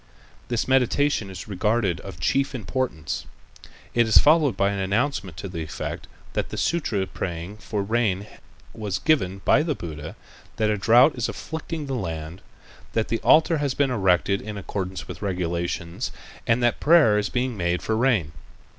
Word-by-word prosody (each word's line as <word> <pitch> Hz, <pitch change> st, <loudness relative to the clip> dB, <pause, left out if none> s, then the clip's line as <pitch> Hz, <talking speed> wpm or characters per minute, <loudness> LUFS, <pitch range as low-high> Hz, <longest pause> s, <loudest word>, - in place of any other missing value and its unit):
This 120 Hz, -1 st, -1 dB
meditation 130 Hz, -3 st, +2 dB
is 95 Hz, -3 st, -8 dB
regarded 105 Hz, -2 st, 0 dB
as -, -, -10 dB
of -, -, -18 dB
chief 135 Hz, -, +1 dB
importance. 90 Hz, -, -3 dB, 0.7 s
It 120 Hz, -1 st, +3 dB
is 110 Hz, -, +5 dB
followed 150 Hz, -, +5 dB
by 100 Hz, 0 st, +2 dB
an 100 Hz, -, -3 dB
announcement 100 Hz, -, -1 dB
to 100 Hz, -, -5 dB
the 85 Hz, -3 st, -5 dB
effect 80 Hz, -1 st, -5 dB, 0.3 s
that -, -, -2 dB
the -, -, -6 dB
sutra 115 Hz, -, 0 dB
praying 90 Hz, +2 st, -5 dB
for 105 Hz, -2 st, -3 dB
rain 105 Hz, -2 st, 0 dB, 0.5 s
was 105 Hz, -4 st, -3 dB
given 95 Hz, -, +1 dB
by 145 Hz, -, +5 dB
the 155 Hz, -2 st, -1 dB
Buddha, 80 Hz, -4 st, -7 dB, 0.4 s
that 110 Hz, -1 st, +1 dB
a 105 Hz, -, 0 dB
drought 120 Hz, +8 st, +6 dB
is 120 Hz, -2 st, -2 dB
afflicting 160 Hz, -1 st, -5 dB
the 135 Hz, -, -4 dB
land, 85 Hz, -5 st, -4 dB, 0.5 s
that 110 Hz, -1 st, 0 dB
the 115 Hz, -, 0 dB
altar 160 Hz, 0 st, +4 dB
has 140 Hz, -3 st, -1 dB
been 140 Hz, -2 st, +2 dB
erected 95 Hz, -3 st, +2 dB
in 105 Hz, 0 st, -6 dB
accordance 95 Hz, -1 st, -4 dB
with -, -, -7 dB
the -, -, -5 dB
regulations 85 Hz, -2 st, -2 dB, 0.4 s
and 120 Hz, +2 st, +2 dB
that 120 Hz, -, +2 dB
prayer 150 Hz, -10 st, +5 dB
is 105 Hz, -, -1 dB
being 125 Hz, -1 st, -1 dB
made 85 Hz, -2 st, -1 dB
for 110 Hz, -, 0 dB
rain. 110 Hz, -, +2 dB
105 Hz, 170 wpm, -24 LUFS, 90-130 Hz, 0.7 s, drought